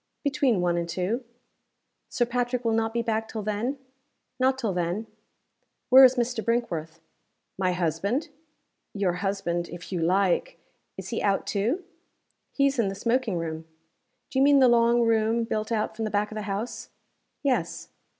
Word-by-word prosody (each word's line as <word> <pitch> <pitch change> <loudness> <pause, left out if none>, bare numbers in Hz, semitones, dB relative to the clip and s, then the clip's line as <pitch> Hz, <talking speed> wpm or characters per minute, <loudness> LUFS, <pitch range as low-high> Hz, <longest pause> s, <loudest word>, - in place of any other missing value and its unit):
"Between 280 -8 +2
one 175 -1 +1
and 170 0 -2
two." 185 +9 -2 0.9
"Sir 240 - +1
Patrick 245 0 -2
will 225 - +2
not 225 0 +1
be 235 0 -1
back 225 -1 -1
till 220 -1 -5
then?" 215 +7 -2 0.6
"Not 260 +1 +3
till 225 -7 -1
then." 180 +5 -2 0.8
"Where 260 +1 +9
is 260 0 +7
Mr. 240 -2 -1
Brinkworth?" 170 -9 -2 0.6
"My 185 -1 0
husband?" 185 - -1 0.7
"Your 195 -3 +1
husband 185 -4 -2
if 175 +2 -9
you 180 -3 -2
like. 195 - +1 0.4
Is - - -7
he - - -2
out, 200 -1 +1
too?" 235 - -1 0.7
"He 275 - +2
is 275 -2 +1
in 225 - +3
the 195 - -3
smoking 230 -1 0
room." 160 -1 -5 0.6
"Do 265 - 0
you - - +4
mean 285 0 +6
the 260 -2 +6
long 235 0 +4
room, 225 0 +2
built 215 -1 -3
out 220 -1 -1
from 220 0 -3
the - - -2
back 210 0 0
of - - -7
the 215 - -3
house?" 205 +5 -4 0.5
"Yes." 270 -3 -1
220 Hz, 170 wpm, -26 LUFS, 190-245 Hz, 0.9 s, Where